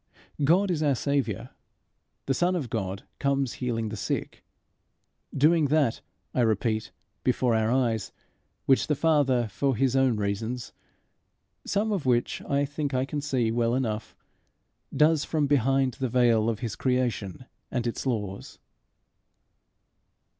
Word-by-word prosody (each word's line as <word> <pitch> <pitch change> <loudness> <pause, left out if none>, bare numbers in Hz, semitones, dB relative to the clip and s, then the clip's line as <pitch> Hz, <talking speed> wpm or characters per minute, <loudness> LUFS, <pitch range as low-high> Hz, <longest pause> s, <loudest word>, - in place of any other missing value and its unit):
God 180 +7 +4
is 160 -3 -1
our 145 -3 +2
Saviour: 135 -3 -1 0.7
the 135 - +1
Son 175 +6 +1
of 140 -10 -3
God 95 -3 -3 0.2
comes 140 -3 0
healing 115 -3 -1
the 110 - -5
sick 100 - -4 0.9
doing 155 +3 +3
that, 145 -4 +1 0.3
I 125 - +1
repeat, 110 -1 0 0.3
before 125 -1 +2
our 110 0 +2
eyes, 115 -6 0 0.5
which 135 - +3
the 150 - +1
Father, 140 -6 +2
for 130 +7 0
his 130 +2 +1
own 130 -4 +3
reasons, 105 +4 -3 0.9
some 210 +2 0
of 180 -10 -2
which 120 -1 +1
I 140 0 +2
think 145 -1 -3
I 130 +1 +1
can 145 +1 -4
see 125 -6 0
well 115 +1 +1
enough, 110 -4 -3 0.8
does 150 +1 +3
from 155 -2 0
behind 135 -1 +2
the 130 0 -3
veil 115 -2 +3
of 115 -1 -3
his 115 -4 -3
creation 125 -4 -1 0.2
and 125 -2 -2
its 120 +3 -3
laws. 105 -6 -3
130 Hz, 140 wpm, -27 LUFS, 115-140 Hz, 0.9 s, God